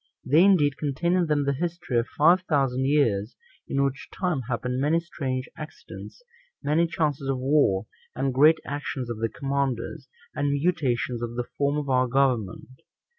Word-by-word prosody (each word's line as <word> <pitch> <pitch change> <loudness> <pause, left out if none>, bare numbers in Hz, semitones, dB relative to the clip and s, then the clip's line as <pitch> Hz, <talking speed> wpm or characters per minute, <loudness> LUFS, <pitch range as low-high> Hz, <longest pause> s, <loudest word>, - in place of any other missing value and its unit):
They, 155 +6 +5
indeed, 160 -8 +4
contain 155 +4 -1
in 180 -2 +2
them 145 -2 +1
the 140 - +1
history 170 -4 -2
of 115 - -2
five 170 +5 +4
thousand 135 -3 +1
years; 115 -7 +1 0.3
in 140 0 0
which 135 0 -3
time 180 -7 -1
happened 125 +2 -2
many 155 +4 +2
strange 130 -6 -4
accidents, 155 - -10 0.4
many 160 +4 +2
chances 145 -4 -1
of 135 - 0
war, 130 -7 +2 0.3
and 135 +1 -1
great 155 +5 +6
actions 135 -4 -4
of 110 - -5
the 115 0 0
commanders, 135 -1 -3 0.2
and 145 -1 0
mutations 135 -6 0
of 120 0 -4
the 120 0 -2
form 140 +1 0
of 150 -1 -3
our 130 -1 +2
government. 130 -2 -1
140 Hz, 165 wpm, -25 LUFS, 125-150 Hz, 0.4 s, great